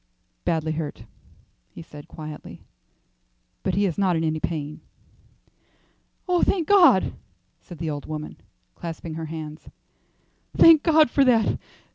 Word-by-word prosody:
"Badly 160 Hz, -2 st, 0 dB
hurt," 155 Hz, -1 st, -5 dB, 0.7 s
he -, -, -11 dB
said, 150 Hz, -1 st, -13 dB
quietly, 155 Hz, -2 st, -10 dB, 1.0 s
"but -, -, -1 dB
he 200 Hz, +1 st, +2 dB
is 180 Hz, -1 st, -2 dB
not 185 Hz, -3 st, +2 dB
in 165 Hz, -, -1 dB
any 155 Hz, 0 st, -1 dB
pain." 150 Hz, -2 st, -4 dB, 1.5 s
"Oh, 360 Hz, -1 st, +2 dB
thank 345 Hz, -5 st, +1 dB
God!" 400 Hz, -4 st, +5 dB, 0.5 s
said 175 Hz, -, -12 dB
the 160 Hz, -1 st, -3 dB
old 145 Hz, -1 st, -6 dB
woman, 155 Hz, -1 st, -6 dB, 0.4 s
clasping 165 Hz, -1 st, -7 dB
her 160 Hz, 0 st, -5 dB
hands. 155 Hz, -1 st, -8 dB, 0.9 s
"Thank 325 Hz, -2 st, +8 dB
God 310 Hz, -5 st, +4 dB
for 280 Hz, -, +4 dB
that! 230 Hz, -4 st, +2 dB
165 Hz, 130 wpm, -24 LUFS, 155-230 Hz, 1.5 s, Thank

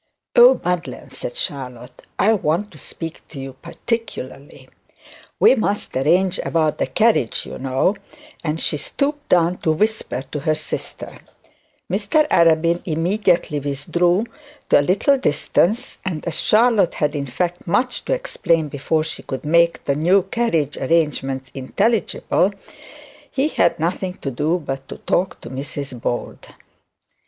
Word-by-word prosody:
'Oh, 245 Hz, +2 st, +8 dB
Madeline,' 180 Hz, -1 st, -3 dB
said -, -, -6 dB
Charlotte, 125 Hz, -, -6 dB, 0.2 s
'I 220 Hz, +3 st, +4 dB
want 200 Hz, +1 st, 0 dB
to 150 Hz, -, -14 dB
speak 165 Hz, +4 st, -7 dB
to 140 Hz, -, -10 dB
you 135 Hz, 0 st, -6 dB
particularly; 170 Hz, -, -6 dB, 0.7 s
we -, -, +7 dB
must 210 Hz, -4 st, -1 dB
arrange 175 Hz, +8 st, +2 dB
about 155 Hz, -2 st, 0 dB
the -, -, +1 dB
carriage, 220 Hz, -, +2 dB
you -, -, -8 dB
know,' 135 Hz, +9 st, +1 dB, 0.5 s
and 155 Hz, 0 st, -1 dB
she 150 Hz, -, -1 dB
stooped 290 Hz, -, -2 dB
down 175 Hz, 0 st, +3 dB
to 160 Hz, -, +1 dB
whisper 210 Hz, -, -1 dB
to 150 Hz, -, -3 dB
her 155 Hz, +2 st, +1 dB
sister. 155 Hz, 0 st, -6 dB, 0.7 s
Mr 210 Hz, -, +1 dB
Arabin 170 Hz, +1 st, +4 dB
immediately 170 Hz, -1 st, +1 dB
withdrew 170 Hz, -, +1 dB, 0.5 s
to -, -, +7 dB
a -, -, +4 dB
little 200 Hz, -, +2 dB
distance, 215 Hz, -, +1 dB
and 175 Hz, -5 st, -4 dB
as 170 Hz, -, -1 dB
Charlotte 215 Hz, -4 st, +3 dB
had 150 Hz, -1 st, 0 dB
in 140 Hz, -2 st, -3 dB
fact 175 Hz, +8 st, -3 dB
much 250 Hz, +8 st, 0 dB
to -, -, 0 dB
explain 170 Hz, -, 0 dB
before 150 Hz, +3 st, 0 dB
she 160 Hz, -, -6 dB
could 130 Hz, +2 st, -6 dB
make 170 Hz, +2 st, +3 dB
the 140 Hz, -, +1 dB
new 180 Hz, +5 st, +3 dB
arrangement 150 Hz, -, 0 dB
intelligible, 195 Hz, -, +1 dB, 0.8 s
he 280 Hz, +3 st, 0 dB
had 170 Hz, -, +2 dB
nothing 180 Hz, +3 st, -1 dB
to 140 Hz, -6 st, -5 dB
do 150 Hz, +7 st, 0 dB
but 135 Hz, -5 st, -5 dB
to -, -, -8 dB
talk 185 Hz, +1 st, -1 dB
to 120 Hz, -, -9 dB
Mrs 135 Hz, -1 st, -6 dB
Bold. 120 Hz, -, -4 dB
170 Hz, 140 wpm, -21 LUFS, 145-200 Hz, 0.8 s, Oh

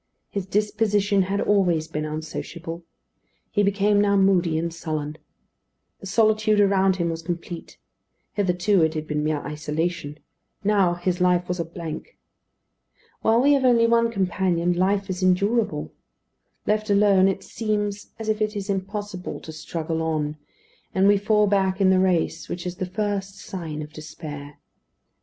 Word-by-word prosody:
His 195 Hz, -2 st, -3 dB
disposition 210 Hz, 0 st, +1 dB
had 195 Hz, +2 st, -1 dB
always 180 Hz, -6 st, +2 dB
been 150 Hz, -1 st, -3 dB
unsociable; 165 Hz, +2 st, -6 dB, 0.7 s
he 205 Hz, -, +2 dB
became 205 Hz, +1 st, +3 dB
now 200 Hz, -1 st, +3 dB
moody 185 Hz, -4 st, +3 dB
and 165 Hz, +1 st, -2 dB
sullen. 155 Hz, -2 st, -4 dB, 0.8 s
The 195 Hz, -, -8 dB
solitude 215 Hz, 0 st, +3 dB
around 195 Hz, -2 st, +4 dB
him 170 Hz, -2 st, -1 dB
was 165 Hz, 0 st, -5 dB
complete. 170 Hz, 0 st, -6 dB, 0.6 s
Hitherto 190 Hz, -1 st, +2 dB
it 160 Hz, 0 st, +2 dB
had 155 Hz, 0 st, -3 dB
been 150 Hz, -1 st, -2 dB
mere 155 Hz, -1 st, -1 dB
isolation; 150 Hz, 0 st, -3 dB, 0.5 s
now 195 Hz, -4 st, +3 dB
his 175 Hz, +1 st, -2 dB
life 180 Hz, -1 st, +3 dB
was 180 Hz, 0 st, -2 dB
a -, -, +1 dB
blank. 165 Hz, -, -7 dB, 1.0 s
While 225 Hz, +2 st, +4 dB
we 290 Hz, +1 st, +5 dB
have 275 Hz, -2 st, +2 dB
only 240 Hz, -2 st, +5 dB
one 230 Hz, 0 st, +3 dB
companion, 180 Hz, -3 st, +1 dB
life 195 Hz, +3 st, +1 dB
is 185 Hz, -1 st, -4 dB
endurable; 185 Hz, -, +1 dB, 0.7 s
left 215 Hz, +1 st, 0 dB
alone, 200 Hz, -2 st, +5 dB
it 195 Hz, 0 st, -1 dB
seems 210 Hz, -2 st, -3 dB
as 225 Hz, -, -6 dB
if 215 Hz, 0 st, 0 dB
it 215 Hz, 0 st, 0 dB
is 200 Hz, 0 st, -2 dB
impossible 195 Hz, 0 st, -4 dB
to 160 Hz, -, -8 dB
struggle 160 Hz, +1 st, -4 dB
on, 155 Hz, -2 st, -1 dB, 0.6 s
and 190 Hz, +1 st, +4 dB
we 205 Hz, -, +6 dB
fall 210 Hz, +1 st, +3 dB
back 195 Hz, -1 st, +1 dB
in 190 Hz, -1 st, +5 dB
the 185 Hz, -, +4 dB
race, 170 Hz, -3 st, +1 dB
which 175 Hz, 0 st, -5 dB
is 180 Hz, 0 st, -4 dB
the 185 Hz, -, -3 dB
first 195 Hz, 0 st, -2 dB
sign 160 Hz, -5 st, -6 dB
of 150 Hz, 0 st, -11 dB
despair. 150 Hz, -2 st, -8 dB
185 Hz, 155 wpm, -24 LUFS, 165-205 Hz, 1.0 s, we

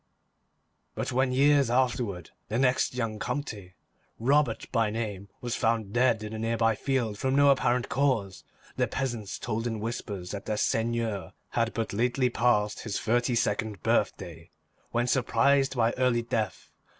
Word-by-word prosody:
But -, -, -3 dB
when, 130 Hz, +1 st, +1 dB
years 140 Hz, 0 st, +4 dB
afterward, 120 Hz, -8 st, 0 dB, 0.2 s
the 110 Hz, -, -1 dB
next 125 Hz, -1 st, +2 dB
young 115 Hz, -3 st, -2 dB
Comte, 110 Hz, -9 st, -4 dB, 0.4 s
Robert 140 Hz, +6 st, +2 dB
by 115 Hz, -3 st, +2 dB
name, 105 Hz, -3 st, -4 dB
was 120 Hz, -1 st, -2 dB
found 110 Hz, -3 st, 0 dB
dead 120 Hz, -2 st, +2 dB
in 105 Hz, +1 st, -6 dB
a 110 Hz, -, -4 dB
nearby 115 Hz, 0 st, +1 dB
field 115 Hz, -3 st, -1 dB
from 130 Hz, 0 st, 0 dB
no 140 Hz, 0 st, +6 dB
apparent 125 Hz, -2 st, +1 dB
cause, 125 Hz, -9 st, 0 dB, 0.3 s
the -, -, +2 dB
peasants 120 Hz, -7 st, -3 dB
told 115 Hz, 0 st, -3 dB
in 110 Hz, -2 st, -3 dB
whispers 105 Hz, -5 st, -5 dB
that 100 Hz, -, -6 dB
their 105 Hz, -1 st, -1 dB
seigneur 115 Hz, -2 st, -1 dB, 0.2 s
had 115 Hz, -1 st, 0 dB
but 115 Hz, -3 st, -2 dB
lately 125 Hz, +3 st, +1 dB
passed 110 Hz, -4 st, +1 dB
his 105 Hz, -3 st, -3 dB
thirty 120 Hz, +2 st, +1 dB
second 110 Hz, -2 st, -1 dB
birthday 90 Hz, -7 st, -1 dB, 0.4 s
when 120 Hz, +1 st, 0 dB
surprised 135 Hz, +2 st, +2 dB
by 115 Hz, -1 st, +3 dB
early 120 Hz, -2 st, +2 dB
death. 115 Hz, -4 st, -3 dB
115 Hz, 150 wpm, -28 LUFS, 110-125 Hz, 0.4 s, no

